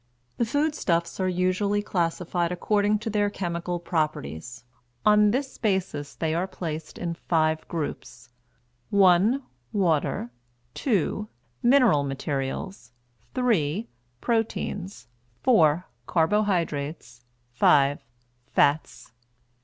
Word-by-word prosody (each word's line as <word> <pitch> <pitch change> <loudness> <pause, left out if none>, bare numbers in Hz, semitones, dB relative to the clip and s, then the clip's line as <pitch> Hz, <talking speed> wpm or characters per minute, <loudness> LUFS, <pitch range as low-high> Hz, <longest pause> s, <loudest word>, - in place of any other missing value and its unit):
The 235 - +1
foodstuffs 230 - 0
are 185 -1 +1
usually 185 +3 +1
classified 175 -1 -1
according 205 +3 +1
to - - 0
their 205 -1 +2
chemical 175 -2 -3
properties; 120 - -3 0.4
on 210 0 +6
this 260 +5 -2
basis 190 - -1
they 160 -1 -1
are 175 +3 0
placed 160 -4 -6
in 170 -1 -3
five 160 -2 0
groups: 125 -7 -5 0.6
(1) 200 +7 +4 0.3
Water, 160 - 0 0.4
(2) 210 - 0 0.3
Mineral 245 - +5
Materials, 135 +1 -4 0.4
(3) 215 - +1 0.3
Proteins, 215 -4 -2 0.4
(4) 175 - +4 0.2
Carbohydrates, 160 - 0 0.3
(5) 140 +3 +4 0.4
Fats. 145 -3 +1
175 Hz, 90 wpm, -26 LUFS, 155-205 Hz, 0.6 s, on